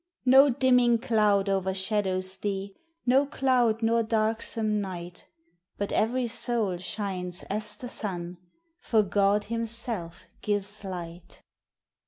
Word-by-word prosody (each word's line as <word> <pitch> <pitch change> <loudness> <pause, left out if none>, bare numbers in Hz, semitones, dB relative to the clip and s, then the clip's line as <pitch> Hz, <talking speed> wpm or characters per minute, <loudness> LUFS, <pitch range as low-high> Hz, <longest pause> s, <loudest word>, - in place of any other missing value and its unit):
No 265 +3 +7
dimming 250 -2 +4
cloud 210 -4 +2
o'ershadows 190 0 -1
thee, 195 -1 -4 0.3
No 265 +3 +4
cloud 245 -5 +1
nor 230 +1 +3
darksome 220 -1 +1
night, 180 -2 -7 0.5
But 205 - -3
every 245 +4 +1
soul 230 -5 0
shines 180 -1 -4
as 210 0 -2
the 245 - -8
sun 180 -6 -4 0.4
For 220 -10 +2
God 200 +1 +2
himself 230 -6 -4 0.2
gives 205 0 -3
light. 175 -2 -8
210 Hz, 110 wpm, -27 LUFS, 190-230 Hz, 0.5 s, No